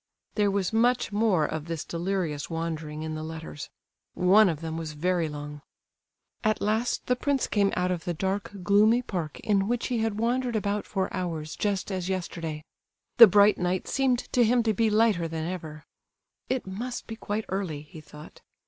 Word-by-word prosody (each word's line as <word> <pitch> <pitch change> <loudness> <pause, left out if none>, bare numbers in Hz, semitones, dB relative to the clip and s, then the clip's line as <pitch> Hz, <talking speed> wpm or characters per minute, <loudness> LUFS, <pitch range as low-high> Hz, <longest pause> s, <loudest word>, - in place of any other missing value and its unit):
There 205 -1 +2
was 195 0 -1
much 240 +1 +2
more 205 -6 +2
of 155 0 -4
this 165 -2 -4
delirious 170 -4 -2
wandering 160 -2 -4
in 160 0 -4
the 155 - -4
letters—one 160 +5 0
of 160 -3 -2
them 160 0 -5
was 160 -2 -5
very 170 +1 0
long. 145 0 -7 0.8
At 215 -1 +2
last 220 +4 0
the 250 - +2
prince 275 +1 0
came 200 -2 +2
out 180 0 0
of 175 -2 -3
the 175 - -1
dark, 195 +4 -2
gloomy 215 +6 +4
park, 170 -9 -4
in 200 -2 +1
which 240 +2 -1
he 245 -2 0
had 220 -2 -1
wandered 240 +2 0
about 205 -1 -1
for 190 -2 -2
hours 165 -4 -3
just 205 -1 -1
as 185 -1 -3
yesterday. 165 -4 -4 0.5
The 230 - +12
bright 205 +2 +5
night 180 +1 -1
seemed 265 -2 +2 0.2
to 245 - +5
him 235 +1 +3
to 220 -1 +2
be 225 +2 +2
lighter 210 -6 +3
than 160 0 -4
ever. 160 -4 -6 0.6
"It 260 -1 -1
must 230 +6 -5
be 225 - -7
quite 210 0 -3
early," 180 -7 -3
he 155 +1 -12
thought. 150 0 -13
190 Hz, 180 wpm, -27 LUFS, 160-215 Hz, 0.8 s, The